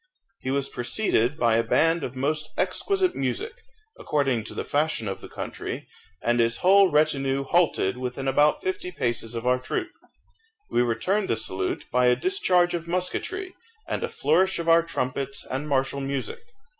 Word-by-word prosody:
He 130 - -5
was 140 0 0
preceded 125 - 0
by 115 -2 +3
a 115 - +2
band 165 +7 +2
of 125 - -5
most 150 +3 -1
exquisite 385 -2 +1
music, 130 - -2 0.5
according 135 -6 0
to - - -8
the - - -2
fashion 145 -6 0
of 95 - -4
the - - -10
country, - - -6 0.4
and 120 0 +2
his 115 0 +2
whole 195 0 +7
retinue 140 -3 +1
halted 135 - +2
within 130 +1 -4
about 145 - +3
fifty 375 -1 -3
paces 120 - -2
of 115 +1 -4
our 125 0 +3
troop. 350 - -3 0.8
We - - +3
returned 180 - 0
the - - +2
salute 95 -3 -2
by 125 0 +3
a 125 - +5
discharge 185 - +2
of 170 -1 -3
musketry, 355 - -2 0.3
and - - -2
a - - -1
flourish 180 +7 +2
of 170 -1 -4
our 165 0 +6
trumpets 140 -4 -3
and 145 +3 -4
martial 135 0 0
music. 140 - -3
140 Hz, 170 wpm, -25 LUFS, 125-175 Hz, 0.8 s, whole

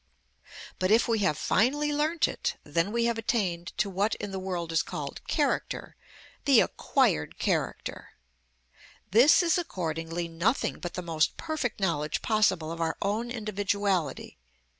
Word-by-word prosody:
But 185 - +1
if 225 +3 +4
we 230 -2 +1
have 185 -7 +1
finally 290 - +2
learnt 310 +3 +2
it, - - -3
then 165 +6 0
we 235 +1 +1
have 235 -1 0
attained 185 -7 -1
to - - +1
what 200 +3 0
in 205 -1 -6
the 190 - -3
world 180 -3 -3
is 165 - +3
called - - -6
character, - - -1 0.5
the - - +6
acquired 75 0 +1
character. - - -2 1.0
This 250 - +6
is 340 +1 +3
accordingly 165 - -3
nothing 170 +10 0
but 175 -1 -6
the 180 - -4
most 160 -2 0
perfect 310 -9 -3
knowledge 150 -6 -1
possible 190 -7 +2
of 170 0 -5
our 165 0 -1
own 215 +4 -1
individuality. 205 - -2
195 Hz, 145 wpm, -28 LUFS, 170-230 Hz, 1.0 s, the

